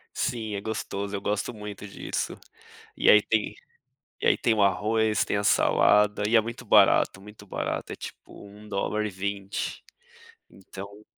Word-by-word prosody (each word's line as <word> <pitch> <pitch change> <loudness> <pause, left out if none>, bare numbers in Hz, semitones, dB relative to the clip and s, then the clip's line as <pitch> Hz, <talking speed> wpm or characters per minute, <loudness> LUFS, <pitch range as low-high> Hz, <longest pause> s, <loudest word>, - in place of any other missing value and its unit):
Sim, 110 -3 -2
é 100 - -4
gostoso, 100 -2 -4
eu 100 - -4
gosto 105 +4 -2
muito 105 -1 -8
disso. 100 - -4 0.6
E - - +5
aí 105 - +7
tem 110 0 0 0.7
e - - -2
aí - - +5
tem 115 - +1
o 110 -2 +2
arroz, 110 +2 +2
tem - - -1
a 100 - -1
salada 105 0 +3
e 115 - 0
é 115 - +8
muito 115 +2 -7
barato, 100 -3 +4
muito 105 +1 -14
barato, - - -4
é - - -6
tipo 100 - -11
$1.20 100 -1 -3 0.7
então 100 +2 -11
105 Hz, 150 wpm, -26 LUFS, 100-110 Hz, 0.7 s, é